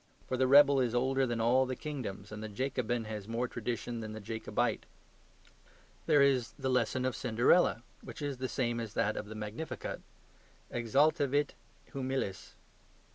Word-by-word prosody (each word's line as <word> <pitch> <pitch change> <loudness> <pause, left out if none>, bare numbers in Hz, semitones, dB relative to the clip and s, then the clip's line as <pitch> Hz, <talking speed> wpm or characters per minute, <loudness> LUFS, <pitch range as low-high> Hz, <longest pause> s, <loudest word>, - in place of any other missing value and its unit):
For 130 - -1
the 130 0 +2
rebel 140 0 +7
is 120 -2 +1
older 130 +2 +2
than 120 -1 -2
all 125 +3 +3
the 130 - -3
kingdoms, 115 -10 -6
and 105 0 -6
the 110 - -5
Jacobin 120 0 -1
has 105 -2 -6
more 115 +2 -1
tradition 120 -1 -4
than 110 -1 -6
the 110 - -6
Jacobite. 110 +2 -2 1.2
There 145 -2 +6
is 130 -4 +2
the 135 -2 -2
lesson 125 +1 +1
of 130 -3 0
"Cinderella," 120 +3 +3 0.2
which - - -9
is 145 -3 -3
the 130 -1 -2
same 120 -3 -1
as 110 -3 -6
that 110 +1 +1
of 105 - -5
the 110 - -8
Magnificat 110 +9 -5 0.7
EXALTAVIT 140 +4 +2 0.4
HUMILES. 130 -8 -3
120 Hz, 160 wpm, -32 LUFS, 110-135 Hz, 1.2 s, rebel